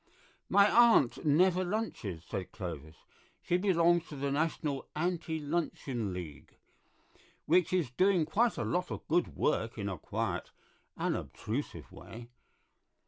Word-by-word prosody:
"My 200 0 +6
aunt 230 - +5
never 180 +5 +4
lunches," 175 - -3
said 95 -2 -5
Clovis; 80 -5 -7 0.5
"she 175 - +1
belongs 175 -3 +3
to 150 - -8
the 140 0 -2
National 150 -1 -1
Anti 165 0 -1
Luncheon 145 - -2
League, 85 -5 -8 0.9
which 175 +1 +3
is 175 -9 0
doing 185 +3 +3
quite 220 +9 +1
a - - -1
lot 180 +1 -1
of - - -7
good 175 +3 +1
work 115 -6 0
in 100 -2 -3
a 95 -5 -4
quiet, - - -3 0.5
unobtrusive - - -4
way. 120 +1 -11
155 Hz, 130 wpm, -31 LUFS, 115-180 Hz, 0.9 s, My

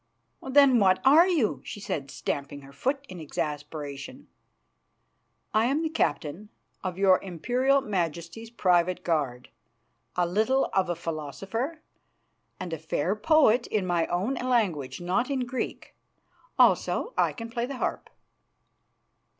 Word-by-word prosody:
"Then 265 -2 +6
what 185 -2 +4
are 310 +7 +7
you?" 315 - +1
she - - -7
said, 140 -8 -4
stamping 140 0 -4
her 140 0 -14
foot 270 - -2
in 185 - -9
exasperation. 150 -2 -5 1.2
"I 215 +1 +3
am 280 +6 +1
the 320 - 0
captain 165 - -2 0.3
of 185 -1 -3
your 190 -1 +4
Imperial 250 - +1
Majesty's 175 - -3
private 180 -4 +1
guard, 140 -7 -1 0.7
a 180 - +2
little 220 +9 +1
of 190 -2 +1
a 175 - 0
philosopher, 190 - -4 0.8
and 180 -3 -5
a 160 - -4
fair 160 +4 -1
poet 250 -1 +4
in 205 -4 -1
my 175 -2 +1
own 190 +9 -1
language, 220 - 0
not 185 +9 0
in 275 -2 0
Greek. 250 +1 -4 0.6
Also, - - +3
I - - +2
can 230 -1 -8
play 235 0 -2
the 275 -1 -6
harp." - - -3
190 Hz, 135 wpm, -27 LUFS, 165-250 Hz, 1.2 s, are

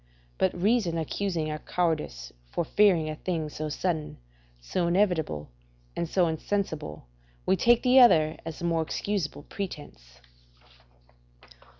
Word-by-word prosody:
But 95 - +1
reason 200 -4 +2
accusing 165 -1 -2
our 155 - -4
cowardice 155 - -2 0.2
for 170 - -1
fearing 180 -4 +3
a 155 - -3
thing 160 -4 -2
so 155 +1 -5
sudden, 160 0 -2 0.4
so 170 - -1
inevitable, 170 - 0 0.4
and 170 - -2
so 180 -1 +3
insensible, 160 - -3 0.4
we - - +3
take 235 +5 +4
the 255 +1 +6
other 160 -11 +6
as 165 -1 -6
the 170 - -5
more 165 -1 +1
excusable 160 -2 -3
pretence. 145 - -8
165 Hz, 125 wpm, -27 LUFS, 155-190 Hz, 0.4 s, the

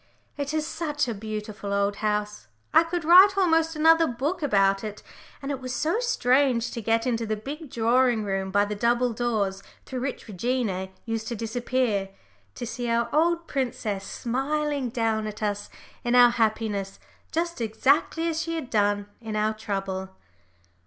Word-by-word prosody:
It 285 0 -3
is 310 -1 -1
such 310 -4 -2
a 235 - -1
beautiful 210 -1 -6
old 200 0 +1
house. 210 -1 -2 0.3
I - - +8
could 335 0 -3
write 375 +4 +8
almost 325 -3 +3
another 325 +1 +5
book 290 +9 -2
about 195 -7 +2
it, 210 -1 -6 0.4
and 275 - -3
it 270 -2 -4
was 255 0 -4
so 330 +9 0
strange 255 - +2
to 230 - -5
get 225 +2 +1
into 230 -2 -1
the 215 - 0
big 285 +8 -7
drawing 240 0 +2
room 195 -1 -2
by 205 +1 +3
the 205 - -4
double 240 +3 +1
doors 215 -5 -1 0.2
through 260 - -5
which 265 -2 -4
Regina 210 -2 -2 0.2
used 225 -1 -3
to 235 - -3
disappear, 230 -2 -1 0.5
to - - -5
see 240 +1 -4
our 235 0 +1
old 335 +2 +2
princess 230 -8 -2
smiling 275 +4 -2
down 225 -2 0
at 215 0 -6
us 205 -1 -2 0.3
in 240 0 +1
our 245 -1 +8
happiness 215 -4 -1 0.3
just 340 -3 -2
exactly 275 +9 +1
as 325 -1 -1
she 330 0 -3
had 305 -6 -5
done 205 -1 +2 0.2
in 220 -2 -5
our 215 +1 +1
trouble! 195 -3 -4
235 Hz, 165 wpm, -26 LUFS, 210-290 Hz, 0.5 s, I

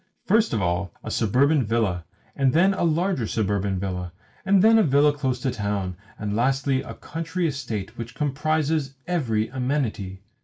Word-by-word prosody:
First 220 +3 +3
of 110 -4 0
all 85 +1 -1
a - - -5
suburban 135 +7 +3
villa, 105 -6 0 0.3
and 135 -2 +2
then 185 +5 +4
a 190 - -2
larger 170 - +1
suburban 100 -3 0
villa, 90 -2 -3 0.3
and 195 -1 +4
then 225 +1 +7
a - - +5
villa 145 -1 +4
close 130 -3 -2
to 135 - 0
a - - 0
town, 100 -4 -2 0.2
and 105 0 -3
lastly 135 +3 +1
a - - -8
country 165 +2 -3
estate 120 -8 -3
which 115 0 -6
comprises 150 0 0
every 115 -11 0
amenity! 125 -8 -2
130 Hz, 165 wpm, -24 LUFS, 105-155 Hz, 0.3 s, then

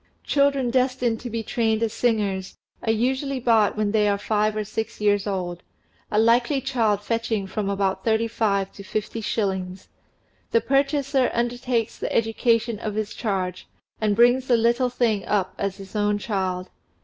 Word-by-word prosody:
Children 280 -3 +2
destined 250 -2 +1
to 245 - -6
be 225 0 -3
trained 220 0 0
as 225 -1 -1
singers 205 -5 -1 0.2
are 225 - +1
usually 260 +4 0
bought 225 -4 +3
when 210 -1 +1
they 210 -1 +3
are 200 -1 +2
five 210 +1 0
or 215 - -1
six 220 +2 -5
years 205 -1 +2
old, 180 -3 -3 0.5
a 210 - -1
likely 235 +5 +3
child 230 -6 0
fetching 225 -2 -1
from 200 +1 -3
about 195 -1 -1
thirty 225 0 +2
five 200 -4 0
to - - -11
fifty 215 +3 -4
shillings; 190 -4 -2 0.6
the 460 - +3
purchaser 275 - +1
undertakes 240 -1 -1
the - - -3
education 230 0 +1
of 215 -2 -4
his 215 -1 -2
charge, 185 -4 -3 0.3
and 210 -1 +2
brings 245 +3 +4
the 240 - +4
little 240 +2 +2
thing 225 -5 0
up 195 -3 0
as 200 -1 -2
his 195 +1 -11
own 205 0 +1
child. 190 -3 -3
220 Hz, 165 wpm, -24 LUFS, 205-240 Hz, 0.6 s, brings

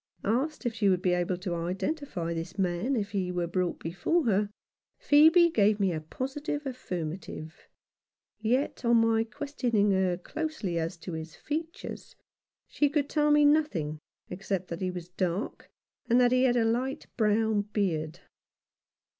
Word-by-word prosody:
Asked 265 +7 0
if 240 - 0
she 210 -3 +2
would 185 -1 +1
be 180 -2 +3
able 180 0 0
to 180 -1 -4
identify 180 - -3
this 165 +3 -5
man 185 +7 0
if 205 -3 -2
he 190 -3 -1
were 175 -1 -1
brought 180 +1 -1
before 190 - 0
her, 205 -2 +2 0.5
Phcebe 320 +3 +6
gave 210 0 +3
me 195 -3 +2
a 155 - -3
positive 280 - -4
affirmative; 170 - -6 0.7
yet 250 +7 0
on 235 0 +4
my 225 0 +3
questioning 235 -4 0
her 190 -2 +2
closely 285 - -3
as 165 +2 -3
to 175 +1 -7
his 160 0 -6
features, 325 +4 -6 0.5
she 290 - +1
could 290 -1 0
tell 300 -1 +2
me 295 0 +5
nothing 215 - +2 0.3
except 185 0 -3
that 170 +1 -5
he 185 - 0
was 180 -2 -6
dark, 180 +3 -3 0.4
and 240 +2 +5
that 245 -1 +4
he 255 +1 +4
had 245 -1 +3
a 230 - +3
light 250 +4 -1
brown 220 -1 +2
beard. 175 -5 -2
205 Hz, 155 wpm, -29 LUFS, 180-265 Hz, 0.7 s, Phcebe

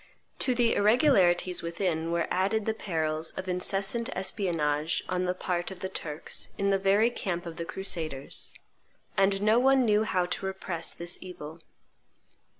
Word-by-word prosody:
To 255 - +3
the 235 -1 +3
irregularities 200 - +3
within 170 -1 -2
were 170 -1 0
added 200 +4 +1
the 220 - +1
perils 160 -6 -2
of 190 - -5
incessant 195 +6 +1
espionage 165 -6 0
on 185 0 -1
the 180 0 0
part 175 -1 -2
of 190 -2 -10
the 190 - -3
Turks 155 -4 -5
in 200 0 +1
the 195 - +2
very 200 +4 +3
camp 175 -6 -3
of 165 -1 -7
the 170 - -4
crusaders: 160 -8 -1 0.6
and 195 0 +2
no 215 +3 +5
one 265 0 +4
knew 210 -1 +3
how 185 -4 +1
to 185 - -3
repress 185 -3 -2
this 170 +1 -3
evil. 165 -3 -9
185 Hz, 155 wpm, -28 LUFS, 170-200 Hz, 0.6 s, no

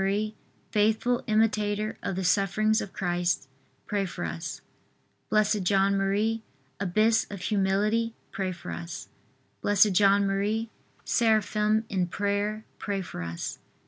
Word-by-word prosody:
faithful 220 +3 +2
imitator 215 -1 +1
of 190 - -2
the 190 - -2
sufferings 210 +4 +2
of 195 - -6
Christ, 175 -4 -1 0.4
pray 200 -2 -1
for 165 - -5
us. 80 0 -5 0.7
B. 215 0 +5 0.2
J. 195 +1 +1
M., 200 +3 +2 0.4
abyss 215 +4 +2
of 200 - -6
humility, 210 +3 +1 0.2
pray 190 -3 -2
for 175 0 -7
us. 170 0 -6 0.5
B. 205 - +1
J. 200 0 +5
M., 200 +3 +2 0.4
seraphim 215 -1 +2
in 185 -4 0
prayer, 205 +3 -1
pray 200 -2 -2
for 90 - -7
us. 85 0 -5
205 Hz, 120 wpm, -27 LUFS, 190-215 Hz, 0.7 s, B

